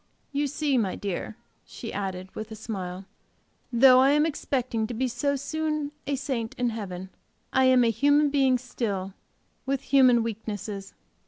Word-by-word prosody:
"You 290 +1 0
see, 285 -2 +1
my 195 -5 -1
dear," 200 +2 -4 0.3
she 225 - -8
added, 190 -2 -4
with 215 0 -6
a 220 - -7
smile, 195 -4 -6 0.7
"though 255 +1 +7
I 265 +1 +5
am 300 +1 +4
expecting 255 -7 -1
to 240 - -5
be 260 +3 0
so 280 +4 0
soon 305 +1 -2 0.2
a 280 - +1
saint 250 -4 -3
in 245 -1 0
heaven, 190 -4 -6 0.4
I 265 0 +4
am 255 -1 +5
a 230 - +3
human 285 +5 +3
being 265 -3 +3
still, 205 -6 -4 0.5
with 270 -1 0
human 255 -5 +5
weaknesses. 210 -3 -5
245 Hz, 160 wpm, -26 LUFS, 210-275 Hz, 0.7 s, though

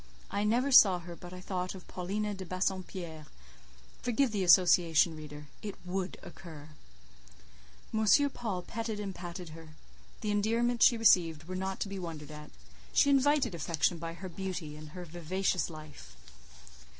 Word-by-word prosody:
I 205 - 0
never 245 +6 +2
saw 195 -7 +8
her, 175 0 -9
but 175 0 -11
I 180 - -8
thought 180 0 -3
of 185 - -12
Paulina 205 +4 -3
de 190 -1 -6
Bassompierre: 185 -3 -3 0.7
forgive 245 +1 +1
the 205 -3 -1
association, 170 -2 +5
reader, 150 -1 -9 0.2
it 205 -2 -5
would 185 +1 -3
occur. 155 -4 -11 1.2
M. 220 0 +1 0.3
Paul 200 -7 -4
petted 225 +2 -4
and 200 -2 -4
patted 175 -1 -7
her; 155 0 -12 0.5
the 210 - -1
endearments 230 +3 +3
she 235 - +1
received 165 -8 +4
were 185 +3 -6
not 190 +1 -3
to - - 0
be 195 -1 -5
wondered 160 -4 -7
at; 150 0 -10 0.4
she 280 - +4
invited 275 -4 +3
affection 170 +1 0
by 165 0 -5
her 185 +3 -8
beauty 180 -4 -5
and 155 0 -10
her 180 - -6
vivacious 175 +3 -1
life. 155 - -11
185 Hz, 155 wpm, -31 LUFS, 165-205 Hz, 1.2 s, saw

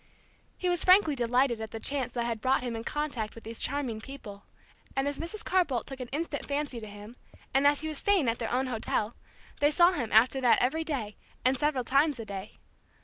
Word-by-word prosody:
He 365 - -2
was 350 -2 +1
frankly 365 -5 +6
delighted 245 -1 +2
at 220 - -5
the 225 - -6
chance 265 0 0
that 240 - -1
had 230 -2 -3
brought 260 +1 +2
him 240 -2 -3
in 225 - -5
contact 270 -7 -3
with 230 - -11
these 225 +1 -6
charming 255 -5 -1
people; 220 -6 -10 0.5
and 270 +1 +1
as 285 -1 -3
Mrs. 415 +7 -6
Carr 370 -1 +4
Bolt 255 -8 -3
took 270 -1 -8
an 250 - -5
instant 290 +2 -3
fancy 285 -3 -2
to 215 - -8
him, 205 +3 -11 0.4
and 275 +1 +5
as 290 0 +3
he 315 - -3
was 310 -2 -5
staying 390 -9 +2
at 230 0 0
their 230 - -3
own 255 +2 +1
hotel, 225 -2 -1 0.5
they 290 - +5
saw 345 +4 +5
him 240 -11 -3
after 250 +5 +5
that 245 -2 +5
every 310 +6 +1
day, 255 -10 -4 0.3
and 260 +1 +4
several 275 -1 0
times 275 +2 +2
a 225 - -5
day. 200 0 -7
260 Hz, 225 wpm, -29 LUFS, 230-295 Hz, 0.5 s, frankly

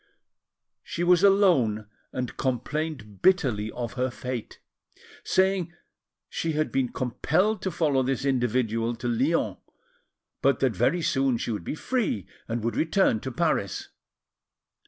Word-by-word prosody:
She 170 - -4
was 180 +1 +4
alone, 170 - +4 0.2
and 125 -1 -4
complained 130 -4 -3
bitterly 125 - +2
of 120 -2 -4
her 130 0 0
fate, 125 -1 -6 0.6
saying 190 -2 +1 0.5
she 165 -1 -2
had 155 0 0
been 130 -2 0
compelled 175 - 0
to 190 - -1
follow 150 -6 +1
this 135 +1 -1
individual 120 -3 +1
to 120 +1 -5
Lyons, 130 +8 +1 0.8
but - - +3
that - - +2
very 175 -2 +2
soon 135 -4 +2
she 115 - -3
would 105 -6 -3
be 145 - -4
free 215 - -1 0.2
and 115 -1 -3
would 115 - -1
return 160 - +2
to 130 - -5
Paris. 155 - -1
130 Hz, 135 wpm, -26 LUFS, 120-170 Hz, 0.8 s, was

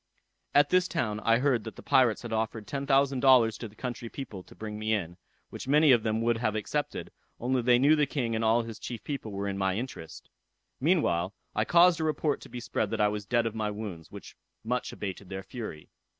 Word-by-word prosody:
"At 145 +1 +5
this 185 0 +4
town 110 -13 -2
I 115 +1 +3
heard 125 -3 +1
that 110 - -8
the - - -12
pirates 125 -4 +3
had 115 -1 -5
offered 110 -1 -2
ten 140 +3 -4
thousand 135 -1 +3
dollars 125 -4 +5
to 115 - -5
the 105 - -18
country 120 0 -5
people 110 -9 -7
to - - -17
bring 105 -1 -6
me 110 +1 +1
in, 85 -4 -4 0.4
which - - -7
many 150 +1 +5
of 120 -3 +5
them 110 +1 -1
would 120 0 +2
have 110 -2 -1
accepted, 145 +8 -3 0.3
only 125 +1 0
they 120 0 +5
knew 145 +5 +5
the 150 -2 +2
king 125 -5 -2
and 110 0 -1
all 115 +1 +3
his 115 -2 -8
chief 120 -3 -6
people 140 -7 -5
were 100 0 -3
in 100 0 -3
my 95 -1 +1
interest. 85 -9 -7 0.5
Meantime, 130 - +2 0.2
I 110 - +1
caused 175 +2 +5
a - - 0
report 155 -1 0
to - - -12
be 125 - -6
spread 120 - -2
that 115 - -3
I 105 0 +4
was 105 -1 -5
dead 120 +1 +2
of 115 - -2
my 110 -1 -2
wounds, 100 -6 -7
which - - -11 0.3
much 125 +3 -2
abated 95 -1 -6
their 95 0 -5
fury. 105 -12 -8
115 Hz, 230 wpm, -29 LUFS, 105-135 Hz, 0.5 s, At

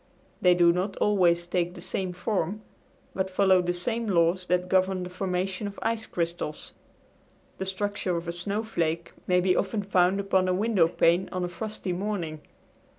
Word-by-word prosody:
They 180 -1 +5
do 170 -1 +5
not 190 +3 -2
always 175 -4 +3
take 175 0 -1
the - - -9
same 185 -2 -3
form, 190 +2 -2 0.5
but 190 0 -1
follow 190 -1 +4
the 175 0 0
same 225 +6 -2
laws 180 -1 +2
that 180 0 +1
govern 185 0 +2
the 180 - -7
formation 185 +2 -2
of 200 - -8
ice 225 -1 -1
crystals. 170 -3 -4 0.9
The 190 - -3
structure 190 -2 -2
of 170 0 -6
a - - -1
snowflake 175 -3 -2 0.2
may 180 0 +4
be 180 0 +2
often 205 +1 -1
found 190 0 +2
upon 190 -2 +2
a 185 - +2
window 200 -4 +3
pane 170 +2 +2
of 185 0 -3
a - - 0
frosty 190 0 -4
morning. 175 -5 -3
185 Hz, 170 wpm, -27 LUFS, 175-200 Hz, 0.9 s, They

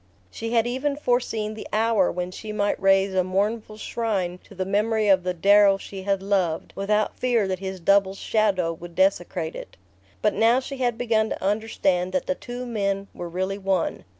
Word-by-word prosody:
She 225 - -5
had 230 -1 +3
even 265 +4 -1
foreseen 245 -6 -1
the 215 - -8
hour 220 -3 +2
when 180 +1 -4
she 215 +3 -7
might 205 -1 -1
raise 195 0 +3
a 185 -1 +2
mournful 210 +4 -1
shrine 200 -6 -2
to 200 - -15
the 185 0 -2
memory 215 +2 +1
of 190 -2 +5
the 180 0 -2
Darrow 200 +2 +5
she 195 0 -8
had 195 0 -1
loved, 190 -5 0
without 210 +1 0
fear 235 -5 +2
that 185 -1 -2
his 190 -1 -5
double's 195 +2 +3
shadow 195 -7 +1
would 170 +1 -11
desecrate 175 -3 0
it. - - -9 0.5
But 210 -1 +3
now 230 +3 +4
she 270 +1 -7
had 245 -3 0
begun 220 -2 +1
to - - -5
understand 195 -3 0
that 275 - 0
the 275 - 0
two 245 -2 -7
men 200 -4 -2
were 175 - -6
really 190 +3 -2
one. 190 - -1
200 Hz, 190 wpm, -24 LUFS, 190-225 Hz, 0.5 s, of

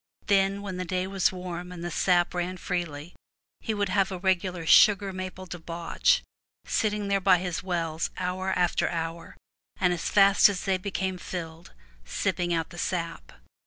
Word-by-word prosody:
Then, 195 0 +2
when 190 -3 -5
the 185 - -2
day 180 +1 -2
was 190 -1 +1
warm, 180 -1 -6
and 175 -1 -8
the 175 - -4
sap 175 0 +2
ran 180 +1 -2
freely, 170 -3 -4 0.5
he 220 - -3
would 205 -2 0
have 195 0 +1
a 185 - -3
regular 185 -2 0
sugar 200 +2 +6
maple 185 0 -6
debauch, 170 - 0 0.4
sitting 210 -1 0
there 200 0 +1
by 185 - +5
his 175 -1 -3
wells 170 -3 -2
hour 185 +1 -2
after 175 -1 +1
hour, 165 0 -5 0.4
and 180 -2 +3
as 170 - -3
fast 200 0 +6
as 195 -3 -4
they 190 -2 +1
became 190 -1 -3
filled 165 -2 -7 0.3
sipping 175 - -1
out 165 0 -1
the 175 - -9
sap. 170 -2 -3
180 Hz, 165 wpm, -27 LUFS, 175-195 Hz, 0.5 s, sugar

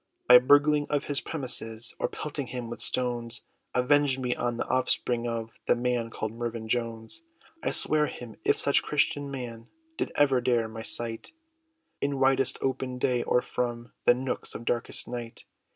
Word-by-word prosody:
By 125 0 +10
burgling 145 +3 +4
of 145 -1 +1
his 145 -1 -1
premises, 120 -6 -3
Or - - +1
pelting 145 -3 -5
him 120 0 -5
with - - -6
stones! 120 -1 -2 0.3
Avenge 135 +1 +4
me, 125 -2 -1
on 120 -1 -1
the - - -1
offspring, 125 -2 +1
of 115 -1 -3 0.2
The - - +5
man, 120 -1 0
called 110 -1 -4
Mervyn 115 -1 -4
Jones!" 115 - -2 0.4
I - - 0
sware 150 0 +3
him, 120 -3 -8
if - - +2
such - - +3
christened 145 -1 0
man, 120 -4 -6 0.3
Did - - -2
ever 135 -3 +4
dare 120 -2 +2
my 110 0 -7
sight, 115 - -2 0.7
In 140 0 0
widest 135 -1 +3
open 130 -1 -1
day, 125 -1 +1
or 125 - +2
from 120 -1 -3
The 120 - +7
nooks, 130 +1 -4
of 115 - -7
darkest 120 -1 0
night! 120 -2 -6
125 Hz, 170 wpm, -28 LUFS, 115-135 Hz, 0.7 s, By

